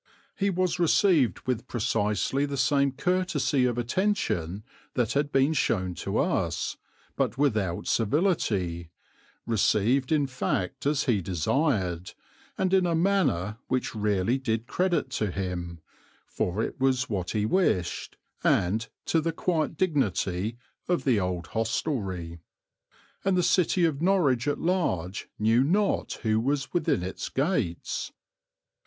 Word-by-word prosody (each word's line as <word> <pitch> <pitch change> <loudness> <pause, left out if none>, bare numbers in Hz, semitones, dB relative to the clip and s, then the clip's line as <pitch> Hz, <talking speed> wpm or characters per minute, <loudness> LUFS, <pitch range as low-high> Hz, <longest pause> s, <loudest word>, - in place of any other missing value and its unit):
He 200 0 +1
was 180 -1 0
received 165 - +3
with 125 -1 -2
precisely 115 +4 0
the 140 -1 -4
same 140 +1 +3
courtesy 150 -3 +1
of 120 -1 0
attention 120 - -1 0.3
that 120 -4 +1
had 145 +1 0
been 135 +3 +3
shown 95 - 0
to - - -3
us, - - 0 0.4
but - - -1
without 110 -11 0
servility, 105 - 0 0.6
received 115 +4 +2
in 150 -2 +3
fact 130 -4 -2
as 145 -1 +2
he 110 -7 +1
desired, 95 - 0 0.4
and 190 0 0
in 185 -2 +4
a 170 - +1
manner 150 - +1
which 130 0 -1
really 105 +3 +1
did 115 -3 -1
credit 175 -2 0
to 105 -4 -1
him, 90 -3 -4 0.4
for 95 +5 -2
it - - -5
was 130 -1 +2
what 95 -5 -3
he 105 - +1
wished, 105 - 0 0.3
and 110 +6 +2 0.2
to 165 - +2
the 165 +1 -1
quiet 160 -1 -1
dignity 110 - 0 0.3
of 175 -1 +1
the 125 -6 +3
old 90 -2 -2
hostelry; 100 - -2 0.8
and 195 -1 +2
the 180 - +3
city 180 0 +3
of 155 -3 -1
Norwich 150 -9 +2
at 145 - +1
large 105 - -1
knew 115 +4 +3
not 195 +8 +1
who 110 -1 +2
was 140 +4 -1
within 165 - +1
its 95 - -5
gates. 135 - -1
125 Hz, 135 wpm, -27 LUFS, 100-160 Hz, 0.8 s, in